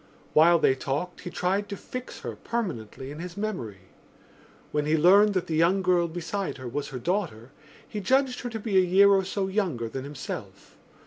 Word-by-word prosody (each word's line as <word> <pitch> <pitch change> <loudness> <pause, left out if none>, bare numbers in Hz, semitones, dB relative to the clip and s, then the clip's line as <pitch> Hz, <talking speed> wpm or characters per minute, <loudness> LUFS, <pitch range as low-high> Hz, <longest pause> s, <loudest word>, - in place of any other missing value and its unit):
While 170 +3 +6
they 135 - +4
talked 140 +7 -4
he - - -6
tried 190 +4 -1
to 200 - -5
fix 255 0 -8
her - - -5
permanently 135 - -4
in 150 - -8
his 175 +1 -7
memory. 150 - -4 0.9
When 150 0 0
he 155 +1 +3
learned 200 +6 +6
that 185 - 0
the 160 - -2
young 175 +4 +3
girl 180 -2 +3
beside 175 +3 -4
her 130 -2 -7
was 140 +4 -3
her 135 - -6
daughter 145 - -2 0.4
he 210 - -5
judged 260 +5 +2
her 245 - -4
to 225 -1 -5
be 205 -2 0
a - - +7
year 190 +3 +5
or 195 -1 +4
so 195 +1 -2
younger 185 - -1
than 130 +4 -5
himself. 145 0 -8
180 Hz, 195 wpm, -27 LUFS, 145-200 Hz, 0.9 s, a